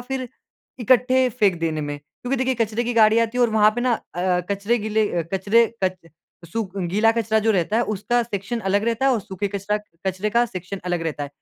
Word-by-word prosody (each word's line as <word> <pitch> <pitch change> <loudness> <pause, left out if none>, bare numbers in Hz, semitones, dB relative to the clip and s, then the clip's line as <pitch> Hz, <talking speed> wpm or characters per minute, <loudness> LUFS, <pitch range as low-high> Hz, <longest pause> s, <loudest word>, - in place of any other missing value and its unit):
फ़िर 255 0 -4 0.5
इकट्ठे 255 +2 +3
फ़ेंक 205 -7 +1
देने 160 -2 -1
में? 145 -1 -4 0.2
क्योंकि 250 +2 -1
देखिए 260 0 0
कचरे 230 0 -1
की 240 - -1
गाड़ी 220 0 +5
आती 230 +1 0
है 245 - +4
और 235 - +3
वहाँ 215 -1 +5
पे 240 - -2
ना 245 0 +2
अ 175 -5 -5
अ, 180 -1 +1
कचरे 200 +4 0
गीले 215 0 0
अ, 175 - 0
कचरे 205 +5 +3 0.2
कच 185 -1 -1 0.5
सुख 205 -4 -3
गीला 195 +5 +2
कचरा 225 -1 +1
जो 225 - +4
रहता 195 +2 0
है 235 - +3
उसका 240 +5 0
सेक्शन 225 +1 -4
अलग 205 +2 +2
रहता 235 +3 0
है 270 - +4
और 225 - 0
सूखे 195 +1 -4
कचरा 200 +1 -2 0.3
कचरे 190 +3 -1
का 235 +2 +3
सेक्शन 185 -1 -6
अलग 175 -2 -1
रहता 155 -3 -3
है। 145 - -4
215 Hz, 225 wpm, -22 LUFS, 190-235 Hz, 0.5 s, गाड़ी